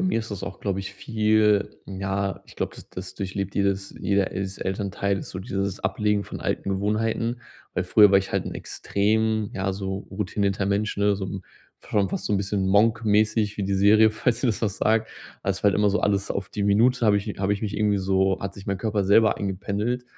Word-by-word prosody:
mir 185 -10 +1
ist 110 -1 -6
das 95 -2 -6
auch, 95 - -6
glaube 95 -1 -2
ich, 95 - -7
viel 105 -2 +2
ja, 95 0 -3
ich - - -16
glaube, - - -3
das - - -13
das 90 0 -7
durchlebt 100 0 -4
jedes 100 0 0
jeder 100 0 +1
Els 95 0 -4
Elternteil, 100 0 -2
so 95 - -7
dieses 100 -1 -3
Ablegen 105 +1 0
von - - -8
alten - - -2
Gewohnheiten, 110 +4 -1 0.3
weil 90 - 0
früher 105 +2 +6
war 100 - +6
ich 95 - -5
halt' - - 0
extrem, 110 +1 0
ja, 95 0 -1
so 95 0 -3
routinierter 100 0 -1
Mensch, 100 +1 0
ne, 100 0 +3
so 95 -1 -4
'n 95 0 -6 0.4
f - - -17
schon 100 -2 +2
fast - - -4
so - - -1
'n 100 - +3
bisschen 100 0 -1
„Monk“-mäßig 110 0 +2
wie 100 - -2
die 100 0 0
Serie 105 +3 +5
falls 115 +2 0
dir 130 - +1
das 110 - -1
was 100 -3 -1
sagt, 110 +1 +2 0.3
weil‘s 95 -1 -2
halt 100 -2 +4
immer 105 0 +3
so 105 - +1
alles 100 -1 0
auf 100 -2 -4
die 105 - -4
Minute 115 +4 +3
habe 105 - +5
ich 100 +1 -2
habe 100 +1 +1
ich 100 +2 -3
mich 105 -1 -3
irgendwie 105 -1 +2
so 95 0 +1
hat 100 - -4
sich 100 - -11
mein 100 -1 -1
Körper 105 -1 0
selber 110 +3 +5
eingependelt 100 +5 -2
100 Hz, 215 wpm, -25 LUFS, 95-105 Hz, 0.4 s, früher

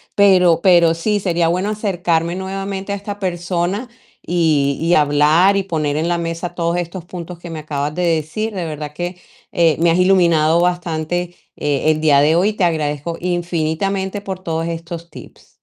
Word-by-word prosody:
pero 180 -4 +5
pero 170 -3 +5
sí 205 +5 0
sería 170 -3 +1
bueno 185 +4 0
acercarme 175 -5 -1
nuevamente 195 +1 -4
a - - -1
esta 200 0 -7
persona 180 +4 -2 0.4
y 155 -5 +1
y 170 +1 +3
hablar 150 +6 +4
y 195 - 0
poner 155 -5 -2
en 160 +2 0
la 175 0 +1
mesa 170 +1 -4
todos 170 0 0
estos 175 0 -4
puntos 175 -1 -8
que 175 0 -10
me 160 - -5
acabas 150 -1 -3
de 180 - -2
decir. 170 +7 -1
De 180 -3 -3
verdad 150 -1 -6
que, 175 +2 -5 0.3
eh, 165 -3 +3
me 170 0 +4
has 170 - +2
iluminado 170 -3 +4
bastante, 175 0 -2 0.2
eh, 145 +1 +1
el 155 - -1
día 145 -3 +5
de 155 +3 +3
hoy. 205 +4 +2
Te 205 - -2
agradezco 160 -1 -1
infinitamente 180 +3 -2
por 190 -2 -5
todos 165 -2 -3
estos 170 0 -6
tips. - - -14
170 Hz, 175 wpm, -18 LUFS, 160-185 Hz, 0.4 s, pero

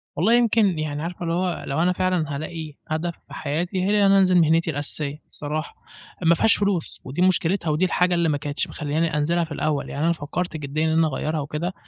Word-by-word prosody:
والله 195 +9 +3
يمكن 225 -7 +3
يعني 150 -1 -3
عارفة 175 +1 -5
اللي 165 -1 -1
هو 180 0 -1
لو 140 +4 0
أنا 180 +2 +3
فعلًا 180 -5 0
هالاقي 155 +1 -6
هدف 160 +2 -2
في - - -13
حياتي، 175 +6 -2
هي 190 - +1 0.2
إن 195 - +5
أنا 195 - +6
أنزل 185 -1 +4
مهنتي 165 0 +3
الأساسيّة 145 0 -3
الصراحة، 155 +2 -4 0.5
مافيهاش 170 +5 +4
فلوس 200 -5 -1
ودي 135 +7 -4
مُشكلتها 180 -1 +2
ودي 155 +4 +2
الحاجة 180 0 +2
اللي 170 -1 +2
ما 145 - +1
كانتش 145 +1 -2
مخلياني 155 +1 -1
أنزلها 170 +4 +1
في 160 - -8
الأول، 150 -1 -1
يعني 145 +3 -2
أنا 170 - +3
فكّرت 160 +2 -4
جديًا 150 +1 -2
إن 160 - +1
أنا 165 -1 +4
أغيّرها 155 +2 -2
وكده، 150 +5 -3
165 Hz, 205 wpm, -23 LUFS, 150-180 Hz, 0.5 s, أنا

